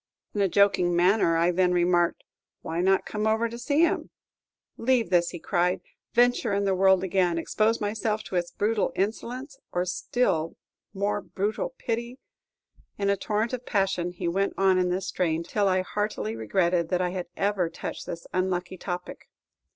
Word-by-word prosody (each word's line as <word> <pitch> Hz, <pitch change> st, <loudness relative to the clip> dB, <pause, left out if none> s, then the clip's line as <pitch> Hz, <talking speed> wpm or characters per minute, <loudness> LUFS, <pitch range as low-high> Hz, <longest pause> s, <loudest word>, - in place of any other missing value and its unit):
In 205 Hz, -, 0 dB
a 195 Hz, -, +4 dB
joking 185 Hz, -3 st, +3 dB
manner, 175 Hz, -1 st, +3 dB
I 170 Hz, +2 st, +3 dB
then 180 Hz, 0 st, +2 dB
remarked, 175 Hz, -1 st, +2 dB, 0.4 s
"Why 165 Hz, +2 st, -2 dB
not 190 Hz, +1 st, +3 dB
come 210 Hz, 0 st, -2 dB
over 220 Hz, +2 st, +2 dB
to 235 Hz, +1 st, -8 dB
see 285 Hz, +5 st, +1 dB
him?" 340 Hz, -, +1 dB, 0.7 s
"Leave 235 Hz, -5 st, +1 dB
this!" 175 Hz, -1 st, +3 dB
cried 175 Hz, +1 st, +1 dB
he; -, -, -31 dB, 0.2 s
"venture 245 Hz, -2 st, +3 dB
in 200 Hz, 0 st, +1 dB
the 195 Hz, -, +2 dB
world 190 Hz, 0 st, +4 dB
again; 180 Hz, -2 st, +1 dB
expose 215 Hz, +7 st, +1 dB
myself 215 Hz, +1 st, -1 dB
to -, -, -7 dB
its 175 Hz, -1 st, 0 dB
brutal 210 Hz, +1 st, 0 dB
insolence, 250 Hz, +7 st, -3 dB
or 180 Hz, 0 st, 0 dB
still 175 Hz, -2 st, 0 dB, 0.4 s
more 205 Hz, +1 st, -1 dB
brutal 215 Hz, -, -3 dB
pity!" 235 Hz, -, -3 dB, 0.8 s
In 200 Hz, -1 st, +1 dB
a -, -, +3 dB
torrent 215 Hz, +4 st, -1 dB
of 250 Hz, -1 st, -5 dB
passion, 195 Hz, -4 st, 0 dB
he 175 Hz, -1 st, -4 dB
went 195 Hz, +3 st, 0 dB
on 190 Hz, -1 st, +4 dB
in 180 Hz, 0 st, +1 dB
this 185 Hz, +1 st, -1 dB
strain, 170 Hz, -3 st, 0 dB
till 205 Hz, +3 st, 0 dB
I 185 Hz, -1 st, +2 dB
heartily 205 Hz, -, -2 dB
regretted 170 Hz, -, +1 dB
that 180 Hz, -1 st, +1 dB
I 180 Hz, -1 st, 0 dB
had 180 Hz, -1 st, -4 dB
ever 195 Hz, -4 st, +1 dB
touched -, -, -6 dB
this 170 Hz, -, -6 dB
unlucky 185 Hz, 0 st, -1 dB
topic. 180 Hz, -1 st, -6 dB
190 Hz, 175 wpm, -26 LUFS, 175-215 Hz, 0.8 s, a